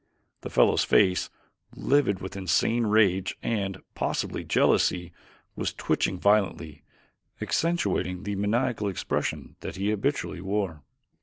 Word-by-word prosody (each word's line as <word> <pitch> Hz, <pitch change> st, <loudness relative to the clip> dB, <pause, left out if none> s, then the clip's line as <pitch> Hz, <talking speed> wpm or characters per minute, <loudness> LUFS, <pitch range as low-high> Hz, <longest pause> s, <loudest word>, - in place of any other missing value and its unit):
The -, -, -6 dB
fellow's -, -, +4 dB
face, 95 Hz, -3 st, +3 dB, 0.5 s
livid 130 Hz, -9 st, +2 dB
with 95 Hz, -, -6 dB
insane 110 Hz, +5 st, +1 dB
rage 100 Hz, -3 st, +2 dB
and, 100 Hz, -4 st, -1 dB, 0.2 s
possibly, -, -, -2 dB
jealousy, 90 Hz, -1 st, +2 dB, 0.4 s
was -, -, -3 dB
twitching 95 Hz, -, 0 dB
violently, 95 Hz, -6 st, +1 dB, 0.6 s
accentuating 160 Hz, -, 0 dB
the 100 Hz, -, -3 dB
maniacal 110 Hz, +2 st, 0 dB
expression 95 Hz, -, -3 dB
that -, -, -7 dB
it 100 Hz, +2 st, 0 dB
habitually 110 Hz, -4 st, -2 dB
wore. 95 Hz, -5 st, -2 dB
100 Hz, 110 wpm, -27 LUFS, 95-110 Hz, 0.6 s, fellow's